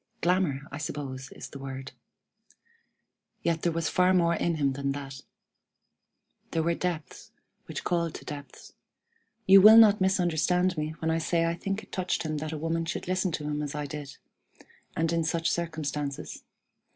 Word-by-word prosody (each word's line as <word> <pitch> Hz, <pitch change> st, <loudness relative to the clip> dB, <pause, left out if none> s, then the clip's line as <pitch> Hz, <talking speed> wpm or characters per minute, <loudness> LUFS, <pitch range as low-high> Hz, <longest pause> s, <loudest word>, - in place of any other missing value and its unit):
Glamour, 175 Hz, -6 st, +1 dB
I 145 Hz, -, -6 dB
suppose, 135 Hz, -3 st, -5 dB
is -, -, -9 dB
the 140 Hz, -, -10 dB
word. 135 Hz, -1 st, -7 dB, 1.5 s
Yet 165 Hz, -1 st, 0 dB
there 170 Hz, -, +1 dB
was 165 Hz, -1 st, -1 dB
far 185 Hz, +1 st, +3 dB
more 170 Hz, -2 st, +3 dB
in 170 Hz, 0 st, 0 dB
him 140 Hz, -3 st, +1 dB
than 140 Hz, 0 st, -2 dB
that. 135 Hz, -2 st, -7 dB, 1.3 s
There 165 Hz, -, 0 dB
were 170 Hz, +1 st, +2 dB
depths, 165 Hz, -5 st, -4 dB, 0.4 s
which -, -, -5 dB
called 170 Hz, -2 st, 0 dB
to -, -, -9 dB
depths; 145 Hz, -1 st, -9 dB
and -, -, -30 dB, 0.7 s
you 195 Hz, 0 st, +8 dB
will 215 Hz, +3 st, +10 dB
not 210 Hz, -3 st, +7 dB
misunderstand 180 Hz, -1 st, +2 dB
me 155 Hz, 0 st, -3 dB
when 160 Hz, 0 st, -1 dB
I 165 Hz, -, +1 dB
say 165 Hz, +1 st, +1 dB
I 165 Hz, -, +1 dB
think 195 Hz, +5 st, -4 dB
it -, -, -18 dB
touched 185 Hz, -3 st, -1 dB
him 155 Hz, -1 st, -2 dB
that 155 Hz, +1 st, -4 dB
a 160 Hz, -, -4 dB
woman 165 Hz, +2 st, -1 dB
should 165 Hz, -, -4 dB
listen 185 Hz, 0 st, 0 dB
to 150 Hz, -, -3 dB
him 150 Hz, 0 st, -2 dB
as 145 Hz, -1 st, -4 dB
I 150 Hz, 0 st, -3 dB
did, 145 Hz, -2 st, -7 dB, 0.8 s
and 165 Hz, +1 st, +1 dB
in 165 Hz, -1 st, +1 dB
such 165 Hz, +1 st, 0 dB
circumstances. 150 Hz, -4 st, -3 dB
165 Hz, 175 wpm, -28 LUFS, 150-175 Hz, 1.5 s, will